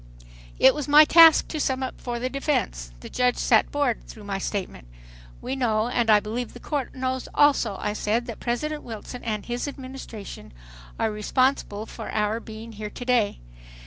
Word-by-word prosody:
It 265 - +6
was 295 -2 -4
my 300 +1 +8
task 325 0 +7
to 310 - -4
sum 265 -2 0
up 260 - -6
for 240 -1 -3
the 245 +2 -2
defense. 255 - -2
The - - -8
judge 250 -1 +1
sat 220 -3 +3
bored 285 -5 0
through 215 - -11
my 200 -1 -3
statement. 185 - -4 0.6
"We 260 - -3
know 230 -3 +1
and 240 -2 0
I 210 -1 +7
believe 225 +3 -5
the - - -9
Court 285 -5 -4
knows 260 0 -2
also," 275 -8 +3
I 210 - -2
said, 220 +3 -1
"that 230 -3 -7
President 300 +6 -2
Wilson 230 +2 -8
and 215 -3 -3
his 240 +3 -3
Administration 255 - -9 0.4
are 220 - 0
responsible 215 0 0
for - - -8
our 215 +1 0
being 225 0 -10
here 210 -1 -6
to 245 - -8
day. 240 -5 +1
240 Hz, 180 wpm, -25 LUFS, 215-265 Hz, 0.6 s, my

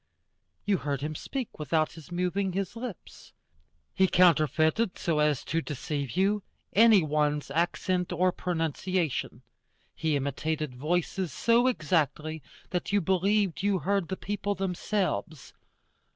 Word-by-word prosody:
You 205 -2 +2
heard 140 -4 -3
him 150 +2 -3
speak 255 - -5
without 155 +1 +1
his 160 +1 -13
moving 180 +2 -1
his 195 +2 -3
lips. 230 -5 -9 0.6
He 190 - +4
counterfeited, 175 +3 +3
so 160 -3 0
as 150 -3 +2
to 165 - -1
deceive 145 0 -4
you, 200 +2 +2 0.3
any 220 -3 +6
one's 150 -1 0
accent 180 +3 0
or 180 +1 +2
pronunciation. 170 -1 -2 0.5
He 160 -2 0
imitated 145 +1 -2
voices 170 +5 -1
so 235 - +3
exactly 155 - 0 0.3
that 180 +1 -2
you 205 - +4
believed 190 +1 +1
you 200 -1 +2
heard 195 +2 0
the 190 - -4
people 205 0 -2
themselves. 185 -4 -2
175 Hz, 125 wpm, -28 LUFS, 155-195 Hz, 0.6 s, any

